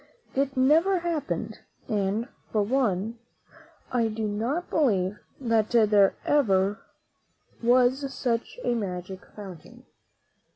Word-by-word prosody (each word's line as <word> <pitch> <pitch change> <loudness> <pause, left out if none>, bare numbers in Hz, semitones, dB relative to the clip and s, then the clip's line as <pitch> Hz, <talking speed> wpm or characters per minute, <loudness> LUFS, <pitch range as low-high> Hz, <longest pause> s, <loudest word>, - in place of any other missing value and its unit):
It 270 0 -1
never 320 +9 +4
happened, 330 -4 -3 0.3
and, 210 +2 -1 0.2
for 210 -2 +2
one, 225 -2 0 0.7
I 235 -2 +2
do 220 0 -2
not 235 +12 -2
believe 210 -9 +1 0.2
that 230 -4 +1
there 210 -4 +4
ever 205 -7 +2 0.8
was 255 +3 +3
such 245 - -2
a 245 - +1
magic 190 -4 -4
fountain. 190 -6 -11
230 Hz, 100 wpm, -26 LUFS, 205-265 Hz, 0.8 s, never